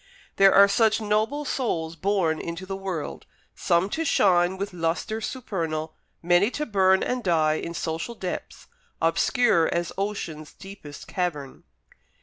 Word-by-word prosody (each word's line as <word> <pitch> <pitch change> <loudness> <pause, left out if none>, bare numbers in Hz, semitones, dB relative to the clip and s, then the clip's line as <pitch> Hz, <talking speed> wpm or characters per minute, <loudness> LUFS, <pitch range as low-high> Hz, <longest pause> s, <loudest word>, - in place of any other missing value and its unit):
There 195 0 +7
are 200 +1 +7
such 220 +2 +3
noble 220 +7 0
souls 165 -13 -2
born 175 -3 0
into 170 +2 -6
the 195 +1 -4
world, 190 -5 -5 0.3
some 170 +2 +1
to 325 - -1
shine 185 - +3
with 200 0 -4
lustre 180 +6 -2
supernal, 165 - -4 0.3
many 175 +4 +4
to 300 - -2
burn 190 -4 +3
and 250 -1 -2
die 155 -3 +2
in 170 - -6
social 165 +8 -4
depths, 185 -4 -6 0.3
obscure 165 +2 +2
as 170 -1 -2
ocean's 170 -7 -4
deepest 195 -7 -11
cavern. 155 -7 -4
185 Hz, 135 wpm, -25 LUFS, 165-210 Hz, 0.3 s, There